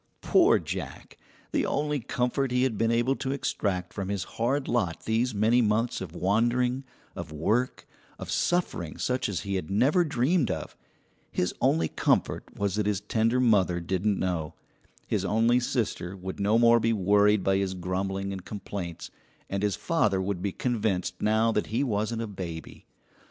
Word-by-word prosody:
Poor -, -, +5 dB
Jack, -, -, -6 dB, 0.4 s
the -, -, +1 dB
only 150 Hz, 0 st, 0 dB
comfort 125 Hz, +2 st, -1 dB
he 125 Hz, +1 st, +1 dB
had 130 Hz, -4 st, +1 dB
been 115 Hz, +2 st, +1 dB
able 120 Hz, +3 st, +2 dB
to 135 Hz, -, -3 dB
extract 95 Hz, -9 st, -2 dB
from 100 Hz, -2 st, -4 dB
his 100 Hz, -2 st, -1 dB
hard 130 Hz, +5 st, -1 dB
lot 100 Hz, -9 st, -1 dB
these 115 Hz, +1 st, 0 dB
many 110 Hz, +4 st, +4 dB
months 115 Hz, +2 st, +1 dB
of 90 Hz, -2 st, -7 dB
wandering, 120 Hz, +8 st, +1 dB, 0.3 s
of -, -, -6 dB
work, 110 Hz, +12 st, 0 dB, 0.3 s
of -, -, -6 dB
suffering 170 Hz, -, -1 dB
such 125 Hz, -3 st, -1 dB
as 95 Hz, -, -2 dB
he 100 Hz, -1 st, -4 dB
had 90 Hz, -5 st, -2 dB
never 140 Hz, -, +3 dB
dreamed 145 Hz, -, +1 dB
of 95 Hz, -, -4 dB, 0.6 s
his 90 Hz, -, 0 dB
only 80 Hz, 0 st, +3 dB
comfort -, -, 0 dB
was 100 Hz, -2 st, 0 dB
that 105 Hz, 0 st, 0 dB
his 105 Hz, -1 st, 0 dB
tender 115 Hz, +4 st, +1 dB
mother 100 Hz, -8 st, +3 dB
didn't 95 Hz, +4 st, 0 dB
know, 85 Hz, -4 st, -2 dB, 0.5 s
his -, -, -1 dB
only 115 Hz, +3 st, +3 dB
sister 115 Hz, -7 st, -2 dB
would 95 Hz, 0 st, -6 dB
no 105 Hz, +3 st, +3 dB
more 115 Hz, 0 st, +6 dB
be 115 Hz, 0 st, +1 dB
worried 105 Hz, 0 st, +3 dB
by 95 Hz, 0 st, +2 dB
his 95 Hz, -1 st, -1 dB
grumbling 95 Hz, +2 st, -2 dB
and 95 Hz, -2 st, -7 dB
complaints, 100 Hz, -5 st, -6 dB, 0.4 s
and 100 Hz, 0 st, -1 dB
his 100 Hz, -2 st, +1 dB
father 165 Hz, -, +1 dB
would 95 Hz, -1 st, -2 dB
be 100 Hz, 0 st, -1 dB
convinced 110 Hz, -6 st, -1 dB
now 110 Hz, +2 st, +3 dB
that 105 Hz, -, 0 dB
he 115 Hz, +5 st, 0 dB
wasn't 110 Hz, -2 st, -1 dB
a -, -, -2 dB
baby. 90 Hz, -6 st, -7 dB
105 Hz, 170 wpm, -27 LUFS, 95-120 Hz, 0.6 s, more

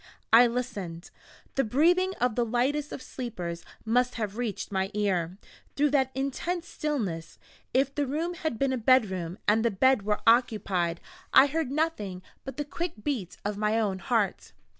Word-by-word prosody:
I 240 Hz, +2 st, +9 dB
listened. 200 Hz, -8 st, -4 dB, 0.4 s
The 270 Hz, -, +2 dB
breathing 350 Hz, -, +3 dB
of 250 Hz, -2 st, +2 dB
the 240 Hz, -, +1 dB
lightest 265 Hz, +6 st, 0 dB
of 260 Hz, -, -6 dB
sleepers 180 Hz, -11 st, -5 dB, 0.2 s
must 245 Hz, +2 st, +2 dB
have 210 Hz, -3 st, -3 dB
reached 230 Hz, -4 st, -3 dB
my 190 Hz, -1 st, 0 dB
ear, 185 Hz, -4 st, 0 dB, 0.4 s
through 290 Hz, 0 st, +2 dB
that 265 Hz, -3 st, +3 dB
intense 330 Hz, +6 st, -2 dB
stillness, 210 Hz, -, -3 dB, 0.3 s
if 270 Hz, +1 st, +2 dB
the 290 Hz, -1 st, -1 dB
room 320 Hz, +6 st, -1 dB
had 315 Hz, -8 st, -3 dB
been 270 Hz, +1 st, +1 dB
a 255 Hz, -, -1 dB
bedroom, 195 Hz, -8 st, +2 dB
and 220 Hz, +2 st, +4 dB
the 235 Hz, -, +3 dB
bed 260 Hz, +4 st, +3 dB
were 210 Hz, +1 st, -1 dB
occupied. 205 Hz, -8 st, +2 dB, 0.3 s
I 270 Hz, -, +10 dB
heard 305 Hz, -1 st, -1 dB
nothing 265 Hz, -, -2 dB, 0.2 s
but 270 Hz, -1 st, -7 dB
the 295 Hz, -, -2 dB
quick 310 Hz, -6 st, -5 dB
beat 235 Hz, -, -3 dB
of 205 Hz, 0 st, -2 dB
my 215 Hz, +1 st, +2 dB
own 200 Hz, -4 st, 0 dB
heart. 220 Hz, -2 st, -1 dB
240 Hz, 165 wpm, -28 LUFS, 200-275 Hz, 0.4 s, I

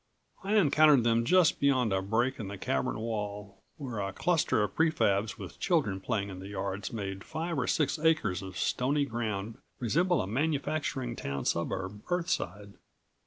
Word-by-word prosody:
I 200 Hz, +3 st, 0 dB
encountered 150 Hz, -, +5 dB
them 115 Hz, 0 st, +2 dB
just 180 Hz, +3 st, +4 dB
beyond 130 Hz, -7 st, +2 dB
a 95 Hz, -, +1 dB
break 120 Hz, +7 st, 0 dB
in 105 Hz, -, -4 dB
the 100 Hz, +1 st, -6 dB
cavern 65 Hz, -7 st, -1 dB
wall, 105 Hz, -2 st, -5 dB, 0.2 s
where 130 Hz, -8 st, -5 dB
a 100 Hz, -1 st, -2 dB
cluster 160 Hz, -, +1 dB
of 105 Hz, -, -3 dB
pre 160 Hz, 0 st, +3 dB
fabs 100 Hz, -7 st, +1 dB
with -, -, -9 dB
children 140 Hz, -, +1 dB
playing 100 Hz, -2 st, -1 dB
in 95 Hz, -1 st, -7 dB
the 95 Hz, -, -8 dB
yards 100 Hz, 0 st, -4 dB
made 95 Hz, -3 st, -5 dB
five 165 Hz, +2 st, -3 dB
or 125 Hz, -, -1 dB
six 150 Hz, +1 st, +1 dB
acres 150 Hz, -, +2 dB
of 95 Hz, -1 st, -8 dB
stony 140 Hz, +3 st, +1 dB
ground 110 Hz, -3 st, -3 dB, 0.2 s
resemble 170 Hz, -, +2 dB
a -, -, 0 dB
manufacturing 140 Hz, +1 st, -1 dB
town 70 Hz, -, -4 dB
suburb 95 Hz, +4 st, -2 dB
Earthside. 135 Hz, -, -2 dB
115 Hz, 165 wpm, -30 LUFS, 100-150 Hz, 0.2 s, encountered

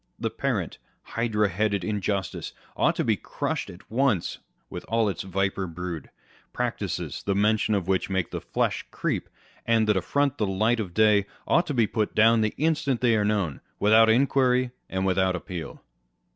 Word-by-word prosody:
The -, -, -2 dB
parent, -, -, -2 dB, 0.2 s
hydra 110 Hz, -3 st, 0 dB
headed 100 Hz, 0 st, 0 dB
injustice 100 Hz, -1 st, -2 dB, 0.2 s
ought -, -, +2 dB
to -, -, 0 dB
be -, -, +2 dB
crushed -, -, -3 dB
at 90 Hz, +4 st, -14 dB
once 120 Hz, -7 st, +1 dB, 0.3 s
with -, -, -7 dB
all 115 Hz, -1 st, +2 dB
its 100 Hz, -, -2 dB
viper 95 Hz, 0 st, -1 dB
brood. 85 Hz, -2 st, -6 dB, 0.4 s
Practices, -, -, -3 dB
the 100 Hz, -, -1 dB
mention 105 Hz, +1 st, +2 dB
of 95 Hz, -3 st, -2 dB
which 95 Hz, 0 st, 0 dB
makes 95 Hz, -3 st, -1 dB
the -, -, -4 dB
flesh -, -, -1 dB
creep, -, -, -2 dB, 0.3 s
and 115 Hz, -1 st, +2 dB
that 105 Hz, -, +3 dB
affront 140 Hz, +9 st, 0 dB
the 105 Hz, -, +1 dB
light 110 Hz, +5 st, +1 dB
of 95 Hz, -6 st, -4 dB
day, 105 Hz, -2 st, +4 dB, 0.2 s
ought 175 Hz, -, +2 dB
to 145 Hz, -, -2 dB
be 115 Hz, -3 st, +4 dB
put 105 Hz, 0 st, -2 dB
down 115 Hz, +1 st, +5 dB
the 110 Hz, -1 st, 0 dB
instant 155 Hz, -5 st, +1 dB
they 120 Hz, -2 st, +4 dB
are 105 Hz, -, +2 dB
known, 100 Hz, -8 st, -1 dB, 0.2 s
without 110 Hz, +2 st, +6 dB
inquiry 130 Hz, 0 st, +3 dB, 0.2 s
and 95 Hz, 0 st, -1 dB
without 95 Hz, -1 st, +2 dB
appeal. 85 Hz, -1 st, -7 dB
105 Hz, 170 wpm, -26 LUFS, 95-115 Hz, 0.4 s, without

